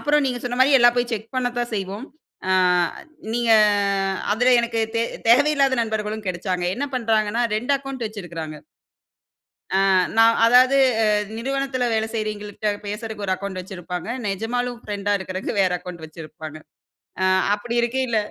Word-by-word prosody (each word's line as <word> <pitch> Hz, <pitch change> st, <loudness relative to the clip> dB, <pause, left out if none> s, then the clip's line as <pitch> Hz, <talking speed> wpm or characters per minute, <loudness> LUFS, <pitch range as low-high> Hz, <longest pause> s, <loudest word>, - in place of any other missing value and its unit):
அப்புறம் 295 Hz, -1 st, +2 dB
நீங்க 250 Hz, -2 st, -2 dB
சொன்ன 245 Hz, 0 st, -3 dB
மாரி, 275 Hz, +2 st, +5 dB
எல்லா 240 Hz, 0 st, +7 dB
போய் 245 Hz, 0 st, -1 dB
செக் 220 Hz, +3 st, -5 dB
பண்ணத்தான் 245 Hz, -2 st, -2 dB
செய்வோம். 200 Hz, +5 st, -4 dB, 0.4 s
அ, -, -, +4 dB, 0.8 s
நீங்க 240 Hz, -1 st, +1 dB, 0.8 s
அதுல 245 Hz, +4 st, +3 dB
எனக்கு 230 Hz, -1 st, -2 dB, 0.2 s
தே 230 Hz, -, +2 dB, 0.3 s
தேவையில்லாத 275 Hz, +1 st, +4 dB
நண்பர்களும் 215 Hz, -1 st, -3 dB
கெடச்சாங்க. 180 Hz, 0 st, -2 dB
என்ன 285 Hz, +3 st, -2 dB
பண்ணுறாங்கன்னா, 225 Hz, -1 st, +1 dB
2 245 Hz, +6 st, -1 dB
அக்கவுண்ட் 270 Hz, -3 st, -6 dB
வச்சுருக்குறாங்க. 170 Hz, -7 st, -7 dB, 1.2 s
அ, -, -, +2 dB, 0.4 s
நான் 225 Hz, 0 st, +6 dB
அதாவது, 255 Hz, +3 st, +5 dB, 0.6 s
நிறுவனத்தில 270 Hz, +1 st, -2 dB
வேலை 220 Hz, 0 st, 0 dB
செய்றவய்ங்கள்ட்ட 210 Hz, -1 st, -3 dB, 0.2 s
பேசறதுக்கு 210 Hz, 0 st, -5 dB
ஒரு 190 Hz, -, +1 dB
அக்கவுண்ட் 190 Hz, -1 st, -5 dB
வச்சிருப்பாங்க. 180 Hz, 0 st, -7 dB, 0.2 s
நெஜமாலும் 240 Hz, +5 st, -2 dB
ஃப்ரெண்ட்டா 205 Hz, -1 st, -2 dB
இருக்கிறதுக்கு 190 Hz, 0 st, -4 dB
வேற 185 Hz, -1 st, +3 dB
அக்கவுண்ட் 175 Hz, -2 st, -9 dB
வச்சிருப்பாங்க. 155 Hz, -1 st, -10 dB, 0.7 s
அ, -, -, +3 dB, 0.3 s
அப்படி 235 Hz, +3 st, -5 dB
இருக்கையில 240 Hz, -1 st, 0 dB
225 Hz, 135 wpm, -22 LUFS, 200-245 Hz, 1.2 s, எல்லா